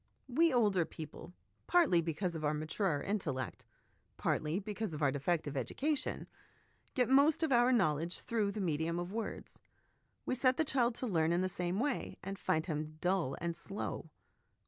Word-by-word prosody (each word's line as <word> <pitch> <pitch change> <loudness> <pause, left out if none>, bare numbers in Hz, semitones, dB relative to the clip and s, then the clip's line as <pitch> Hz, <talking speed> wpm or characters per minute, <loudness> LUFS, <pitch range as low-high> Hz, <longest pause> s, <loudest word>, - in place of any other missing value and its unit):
We 325 +6 +3
older 210 -8 +3
people, 160 +1 -9 0.4
partly 330 - +5
because 170 +2 -2
of 160 -2 -5
our 150 0 +1
maturer 155 +1 -1
intellect, 160 -11 -3 0.5
partly 155 +3 0
because 210 -3 -3
of 150 - -3
our 140 - +4
defective 145 +1 -1
education, 270 - -1 0.7
get 250 -4 +3
most 280 +5 +5
of 315 - +1
our 240 0 +5
knowledge 170 - +2
through 215 -4 0
the 215 - -3
medium 165 -1 0
of 175 +2 -4
words. 225 0 -5 0.7
We - - 0
set 255 0 +3
the 320 - +2
child 245 -4 +2
to 255 - -3
learn 165 -7 +2
in 175 +1 +2
the 185 - +1
same 180 +1 -2
way, 285 +1 -1
and 195 +1 -5
find 160 -3 +1
him 155 -2 -4
dull 180 -7 0
and 170 0 -2
slow. 195 +4 -4
185 Hz, 170 wpm, -34 LUFS, 160-240 Hz, 0.7 s, partly